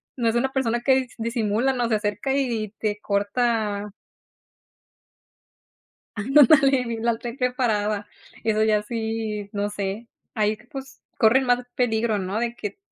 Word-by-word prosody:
no 235 -3 +1
es 225 - -1
una 265 +3 0
persona 240 -3 +1
que 260 +2 +4
dis 255 -3 -2
disimula, 230 +2 0
no, 245 -2 -1
se 220 - +3
acerca 210 +5 -1
y 240 -6 -1
te 210 -1 -1
corta 210 0 0 2.3
Ándale, 270 0 +4
la 230 0 +1
traen 240 +2 -7
preparada. 215 -5 0 0.4
Eso 215 -1 +2
ya 215 -1 +3
sí, 220 -2 -3
no 205 0 -1
sé, 205 +2 -4 0.3
ahí, 215 -1 +1
pues, 270 -1 -9 0.2
corren 250 +4 +4
más 245 0 +2
peligro, 225 -3 +1
¿no?, 195 +2 -2
de 235 0 -2
que 210 - -6
225 Hz, 140 wpm, -24 LUFS, 210-250 Hz, 2.3 s, que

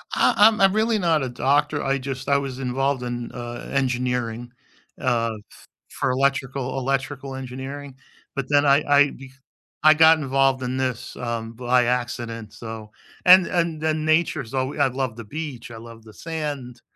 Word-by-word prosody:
Uh, - - +4
I'm 215 0 +6
I'm 195 0 +5
really 220 +1 +2
not 165 -6 +2
a 130 - -3
doctor, 145 +4 +1
I 135 0 +1
just 130 0 -6
I 140 0 +4
was 135 -2 -4
involved 135 +1 -1
in, 120 -1 -5
uh, 120 -1 -7
engineering, 125 -3 -1 0.5
uh, 120 -4 0 0.2
f - - -18 0.2
for 130 - -1
electrical 135 0 -1
electrical 135 0 -3
engineering, 135 +2 -7 0.4
but 140 - -2
then 145 0 +4
I 140 +1 +4
I 145 0 +5
be 130 0 -12 0.5
I 155 - +8
got 160 0 +6
involved 135 -1 +1
in 125 +1 -2
this, 130 -3 -3
um, 115 -2 -4
by 125 +1 +2
accident 120 -3 -3
so 110 -2 -8 0.3
and 185 0 +8
and 165 -3 -1
and 155 -1 0
nature's 155 -6 +1
alw 135 +2 -2
I 140 - +4
love 130 -3 -3
the 115 - -8
beach, 135 0 -7
I 115 - -9
love 115 0 -12
the 110 -1 -15
sand, 145 -6 -5
130 Hz, 170 wpm, -23 LUFS, 120-145 Hz, 0.5 s, I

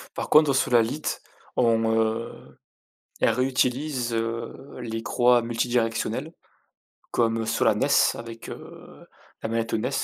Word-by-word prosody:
Par - - -4
contre, 150 -2 +6
Solalite 125 +2 +1 0.3
on, 115 -2 +2
heu, 110 +1 -2 0.6
elle - - +4
réutilise, 125 +1 0
heu, 115 +1 -2 0.3
les 115 -2 -4
croix 120 0 +3
multidirectionnelles 115 0 -1 0.8
comme 115 -1 +1
Solanes 110 +2 +2 0.3
avec, 115 -1 -9
heu, - - -11 0.4
la 110 - -3
manette 115 0 -2
Ones. 115 +3 0
115 Hz, 110 wpm, -25 LUFS, 115-125 Hz, 0.8 s, contre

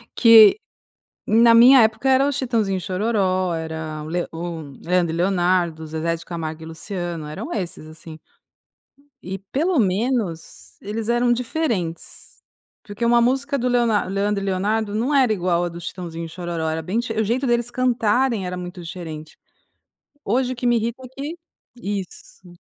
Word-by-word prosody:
que 230 - +8 0.7
na 230 +1 +5
minha 245 +2 +8
época 220 +4 +1
era 265 +2 +4
os 285 - -2
Chitãozinho& 220 -8 0
Xororó, 185 -2 0
era 160 -1 -5
o - - -8
Le 175 +1 -2
o 165 0 -5 0.2
Leandro 175 -1 +1
e - - -3
Leonardo, 175 -3 +1
Zezé 160 +2 -2
de 165 - -9
Camargo 160 -2 -6
e - - -8
Luciano 170 -1 -5
eram 155 - -6
esses 180 -6 -4
assim. 155 0 -11 1.1
E 190 +1 -5
pelo 290 - -1
menos 185 - -2
eles 215 +2 -4
eram 240 0 +2
diferentes, 235 - -3 0.4
porque 205 +3 -5
uma 235 0 +4
música 270 +3 +1
do 250 +1 0
Leonardo 235 -5 +1
Leandro 200 0 -1
e - - -4
Leonardo 205 +3 -1
não 250 +7 0
era 260 -4 +4
igual 175 -3 0
a - - -1
do 170 0 -9
Chitãozinho 170 -1 -6
xororó 165 -1 -4
era 160 +1 -2
bem 185 +8 -2
dife 235 -1 -2
o - - +2
jeito 250 +5 0
deles 240 0 +1
cantarem 240 -3 +1
era 180 0 -4
muito 180 0 -7
diferente. 160 -3 -8 0.9
Hoje 255 +4 0
o - - -10
que 245 - -5
me 240 -1 +4
irrita 235 +3 -3
é - - -11
que 280 +5 -6 0.4
isso. 190 -4 -7
200 Hz, 165 wpm, -22 LUFS, 170-235 Hz, 1.1 s, que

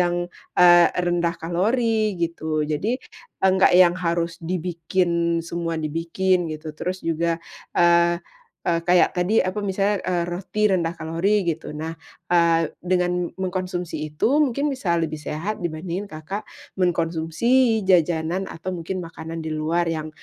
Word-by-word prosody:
yang, 175 0 +1 0.3
eee, 175 -1 +7
rendah 175 -1 0
kalori 215 +5 0
gitu. 160 -2 -1
Jadi 175 +12 -1 0.4
enggak 190 -1 +4
yang 180 -2 +7
harus 170 -1 -2
dibikin, 170 0 -1
semua 170 -1 -3
dibikin 165 +3 0
gitu. 155 0 -6
Terus 180 +4 -5
juga, 165 0 0 0.4
eee 170 0 +5 0.5
eee, 170 -1 +2
kayak 180 +1 +4
tadi 185 +5 +2
apa 185 +3 -2
misalnya, 200 0 0
eee, 175 -1 0
roti 190 +4 -1
rendah 170 -3 +1
kalori 180 +6 +1
gitu. 165 -2 -2
Nah, 160 +2 -4 0.4
eee, 165 -2 +3
dengan 180 -1 0
mengkonsumsi 185 -2 -3 0.2
itu 250 - +2
mungkin 280 +1 0
bisa 195 -10 0
lebih 155 -2 -2
sehat 170 +9 -4
dibandingin 175 +4 -4
Kakak 155 +7 -5 0.4
mengkonsumsi 180 +7 +2
jajanan 175 +1 +2
atau 185 +3 -5
mungkin 175 +2 -4
makanan 165 0 -7
di 160 - -3
luar 160 +3 0
yang 160 -1 -2
175 Hz, 135 wpm, -23 LUFS, 165-185 Hz, 0.5 s, eee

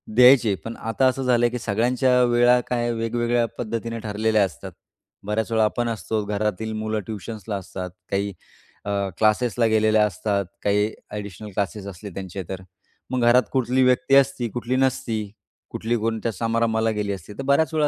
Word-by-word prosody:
द्यायचे. 125 -4 +7
पण 115 - -5
आता 115 +4 +1
असं 130 +1 0
झालं, 120 -1 +3
की 125 0 -4
सगळ्यांच्या 125 +4 +2
वेळा 120 +1 +4
काय 120 -1 0
वेगवेगळ्या 120 +1 0
पद्धतीने 115 0 -3
ठरलेल्या 110 0 +1
असतात. 90 -6 -8 0.5
बऱ्याचवेळा 110 +1 +1
आपण 120 +2 -1
असतो 110 -1 -2
घरातील 105 +1 -2
मुलं 110 0 -2
ट्युशन्सला 110 0 -5
असतात, 95 -1 -6 0.2
काही 100 0 -1 0.5
अ, 100 - -2 0.3
क्लासेसला 115 +2 +2
गेलेल्या 110 0 +4
असतात, 100 0 -1 0.2
काही 105 +1 +2 0.2
अ‍ॅडिशनल 105 0 -7
क्लासेस 100 0 -3
असले 100 +2 -8
त्यांचे 95 0 -5
तर. 95 -1 -5 0.5
मग 130 -1 0
घरात 125 +1 +6
कुठली 130 0 +2
व्यक्ती 125 +1 +3
असती, 135 -3 +3
कुठली 120 +3 -2
नसती, 130 -4 0 0.5
कुठली 115 +2 -1
कोणत्या 115 +1 -1
समारंभाला 115 +1 +1
गेली 105 -1 -2
असती, 95 +2 -9
तर 135 - -6
बऱ्याच 150 +4 +2
वेळा 150 -1 +3
115 Hz, 155 wpm, -23 LUFS, 105-120 Hz, 0.5 s, द्यायचे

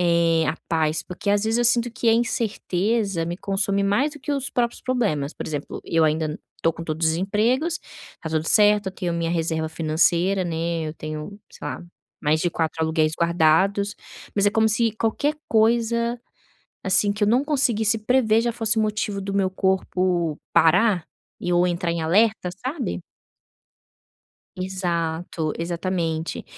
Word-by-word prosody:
eh, 170 -2 +3
a 160 - -1
paz 160 -1 +1
porque, 180 +3 -7
às 205 +1 +2
vezes, 225 +2 +1
eu 240 - +2
sinto 240 0 +3
que 235 -1 -1
a 225 - +6
incerteza 210 -4 0
me 175 - -3
consome 195 +1 0
mais 225 +10 +2
do 295 - -11
que 290 - -3
os 275 -2 -2
próprios 240 -1 -1
problemas. 200 - -1
Por - - -6
exemplo, 145 -2 -5
eu 165 -1 +1
ainda 155 0 0 0.2
estou 165 - +1
com 165 - -8
todos 160 0 0
os 160 - +1
empregos, 235 - 0 0.4
está 160 - -8
tudo 160 0 0
certo, 210 -1 +4
eu 190 - -3
tenho 180 -3 -3
minha 170 0 -1
reserva 160 -1 -1
financeira, 170 +4 +1
né, 165 -1 -2
eu 155 - -7
tenho 155 +6 -7
sei - - -9
lá, - - -5 0.4
mais 155 +1 +1
de 175 - 0
4 160 -1 -2
aluguéis 160 -1 +1
guardados, 170 +5 +2 0.4
mas 200 0 +2
é - - +4
como 220 +1 +3
se 220 +1 +2
qualquer 285 +7 0
coisa, 235 +1 +2 0.6
assim, 195 +2 +3
que 210 0 -1
eu - - +3
não 245 +5 +3
conseguisse 235 -7 +2
prever 225 0 +2
já 235 - 0
fosse 225 -1 +2
motivo 210 -2 -1
do 195 +1 -4
meu 195 -1 +1
corpo 185 -4 0 0.2
parar 180 +1 +4 0.3
e - - -6
eu 175 0 +3
entrar 175 -1 -1
em 170 - -3
alerta, 200 +4 +2 0.2
sabe. 260 - -3 1.6
Exato, 170 -4 -2
exatamente. 170 -1 -3
190 Hz, 165 wpm, -23 LUFS, 165-220 Hz, 1.6 s, a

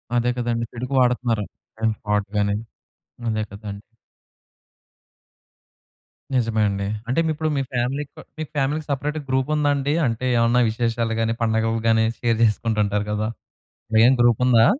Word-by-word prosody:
అదే 120 0 +2
కదండీ! 120 -1 -1
చెడుకు 125 +3 -5
వాడతన్నారు. 120 -4 +1 0.6
ఫ్రాడ్ 105 -1 0
గాని, 100 0 +2 0.7
అదే 110 -1 0
కదండీ! 100 0 -7 2.5
నిజమే 115 -3 +1
అండి. 100 0 -2 0.2
అంటే 130 +6 +1
మీరిప్పుడు 155 0 -1
మీ - - +1
ఫ్యామిలీకో 135 +4 -2 0.2
మీ 155 - -2
ఫ్యామిలీ‌కి 145 +2 0
సెపరేట్‌గా 145 +2 -2
గ్రూప్ 130 +1 +1
ఉందాండి? 145 -1 +1
అంటే 115 +2 -2
ఏమన్నా 115 +1 +3
విశేషాలు 115 -1 -1
గాని, 115 0 +1
పండగలు 115 0 +1
గాని 110 0 +4
షేర్ 115 -2 +1
చేసుకుంటూ 110 0 +1
ఉంటారు 105 +1 -1
గదా! 105 +1 -1 0.7
మెయిన్ 120 +4 +6
గ్రూప్ 120 -1 +4
ఉందా? 115 -2 +6
115 Hz, 130 wpm, -23 LUFS, 110-130 Hz, 2.5 s, మెయిన్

